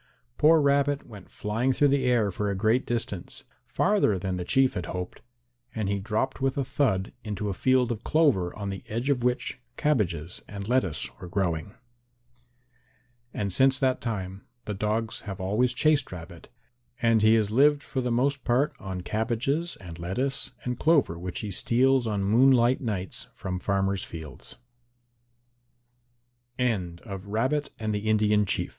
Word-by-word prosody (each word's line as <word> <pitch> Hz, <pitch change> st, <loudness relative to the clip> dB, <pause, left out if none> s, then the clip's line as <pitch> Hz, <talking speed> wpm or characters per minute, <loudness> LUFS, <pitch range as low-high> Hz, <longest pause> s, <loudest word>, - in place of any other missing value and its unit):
Poor 160 Hz, +1 st, +6 dB
Rabbit 140 Hz, 0 st, +2 dB
went 105 Hz, -5 st, -12 dB
flying 115 Hz, +5 st, -1 dB
through 145 Hz, +3 st, +3 dB
the 135 Hz, -1 st, +2 dB
air 120 Hz, -5 st, +2 dB
for 105 Hz, +3 st, -2 dB
a 100 Hz, -, -1 dB
great 110 Hz, +6 st, +1 dB
distance, 110 Hz, -6 st, -4 dB, 0.2 s
farther 195 Hz, -, +2 dB
than 95 Hz, 0 st, -3 dB
the 90 Hz, -, -3 dB
Chief 130 Hz, +7 st, +3 dB
had 90 Hz, -, -4 dB
hoped, 90 Hz, 0 st, -5 dB, 0.5 s
and 110 Hz, -3 st, -1 dB
he 100 Hz, 0 st, 0 dB
dropped 110 Hz, +7 st, -2 dB
with 135 Hz, 0 st, 0 dB
a 135 Hz, -, 0 dB
thud 110 Hz, -9 st, 0 dB
into 105 Hz, -1 st, -3 dB
a -, -, -1 dB
field 125 Hz, +4 st, +2 dB
of 115 Hz, -1 st, -4 dB
clover 135 Hz, -, +2 dB
on 100 Hz, -2 st, -4 dB
the 95 Hz, -, -7 dB
edge 120 Hz, +6 st, -1 dB
of 130 Hz, -3 st, 0 dB
which 125 Hz, +1 st, -1 dB, 0.2 s
cabbages 90 Hz, -, 0 dB
and 100 Hz, -1 st, -7 dB
lettuce 110 Hz, -10 st, +1 dB
were 90 Hz, -, -8 dB
growing. 90 Hz, +2 st, -2 dB, 1.6 s
And 100 Hz, -3 st, -2 dB
since 135 Hz, +4 st, +4 dB
that 130 Hz, -1 st, +1 dB
time 95 Hz, -4 st, -4 dB, 0.2 s
the 105 Hz, -, -3 dB
dogs 110 Hz, +3 st, -1 dB
have 95 Hz, 0 st, -6 dB
always 105 Hz, +7 st, +1 dB
chased 145 Hz, +2 st, +2 dB
Rabbit 85 Hz, -1 st, -10 dB, 0.5 s
and 115 Hz, -2 st, +3 dB
he 110 Hz, +1 st, +6 dB
has 105 Hz, -2 st, +1 dB
lived 145 Hz, +4 st, +4 dB
for 130 Hz, -, -3 dB
the 125 Hz, -, -1 dB
most 135 Hz, +3 st, +1 dB
part 130 Hz, +4 st, +1 dB
on 95 Hz, -2 st, -5 dB
cabbages 120 Hz, -, -1 dB
and 85 Hz, -3 st, -10 dB
lettuce 125 Hz, +11 st, -1 dB
and 125 Hz, -1 st, -3 dB
clover 150 Hz, -, +3 dB
which 90 Hz, 0 st, -5 dB
he 105 Hz, -, -4 dB
steals 125 Hz, +5 st, +2 dB
on 100 Hz, -3 st, -1 dB
115 Hz, 140 wpm, -27 LUFS, 95-135 Hz, 1.6 s, Poor